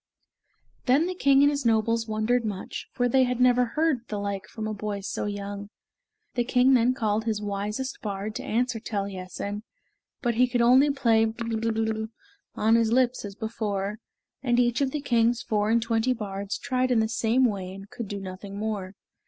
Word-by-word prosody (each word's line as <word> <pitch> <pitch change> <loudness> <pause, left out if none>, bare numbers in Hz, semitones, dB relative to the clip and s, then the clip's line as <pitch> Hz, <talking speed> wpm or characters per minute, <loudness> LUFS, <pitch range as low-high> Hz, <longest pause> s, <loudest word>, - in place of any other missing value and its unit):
Then 275 +6 +4
the 365 - -2
king 280 -5 +4
and 285 - +5
his 285 -1 -2
nobles 230 0 +2
wondered 220 +3 +1
much, 205 -4 -5
for 245 -1 +1
they 260 +2 +4
had 250 -1 +1
never 250 0 +5
heard 305 +3 +1
the 210 - -4
like 200 0 -3
from 220 -1 -5
a 215 - -2
boy 205 -1 -4
so 195 - -3
young. 205 0 -5 0.6
The 240 - +1
king 250 +2 +4
then 250 0 +4
called 220 -2 0
his 220 -2 0
wisest 210 +6 -3
bard 205 0 -4
to - - -5
answer 240 +1 0
Taliessin, 200 -1 -4 0.6
but 240 -1 +2
he 250 +2 +4
could 245 -1 +1
only 260 +4 +6
play 230 -5 +3
"Blerwm" 220 -1 -2 0.5
on 220 +1 +3
his 230 -1 +3
lips 255 0 +2
as 200 -1 -7
before, 210 -2 -3 0.4
and 245 -2 +2
each 240 +1 +2
of 275 - +2
the 295 +2 -3
king's 235 -2 +2
four 210 -1 0
and 230 +1 +4
twenty 230 +2 +1
bards 200 -3 -4
tried 255 -1 0
in 245 -3 +3
the 220 - +2
same 230 +3 +2
way 195 -5 -2
and 195 +1 -11
could 235 - -6
do 200 0 -4
nothing 195 +1 -8
more. 205 -3 -3
225 Hz, 185 wpm, -26 LUFS, 205-245 Hz, 0.6 s, only